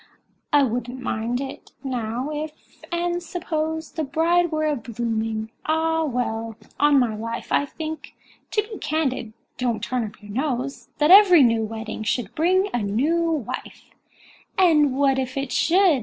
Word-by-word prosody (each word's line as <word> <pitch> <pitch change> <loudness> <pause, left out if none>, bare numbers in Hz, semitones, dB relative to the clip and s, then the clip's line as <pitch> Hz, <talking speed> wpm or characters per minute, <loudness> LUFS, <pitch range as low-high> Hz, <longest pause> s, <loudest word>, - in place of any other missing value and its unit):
"I 290 -2 +5
wouldn't 245 0 -2
much - - -9
mind 235 +3 -2
it, 270 -1 -8
now—if—and 300 +8 -3
suppose— 320 -2 -3
The 320 - -3
bride 335 +4 +2
were 310 0 0
a 300 -1 +1
blooming—Ah! 235 +8 -1
well—on 235 +2 0
my 240 -5 +2
life, 230 +2 -5
I 285 - +3
think—to 315 +7 -5
be 430 0 -9
candid—(don't 250 -5 -2
turn 250 0 -1
up 215 -1 -8
your 205 -1 -11
nose!) 265 +2 -2
That 300 +3 +4
every 370 -6 +9
new 230 -2 +3
wedding 220 0 -5
should 220 -1 -1
bring 370 +5 +2
a 245 - 0
new 260 +12 +1
wife!" 300 -9 -5 0.7
"And 300 -7 +4
what 270 -1 +3
if 260 +1 -3
it 275 -1 -2
should?" 355 -4 +4
275 Hz, 140 wpm, -23 LUFS, 230-320 Hz, 0.7 s, every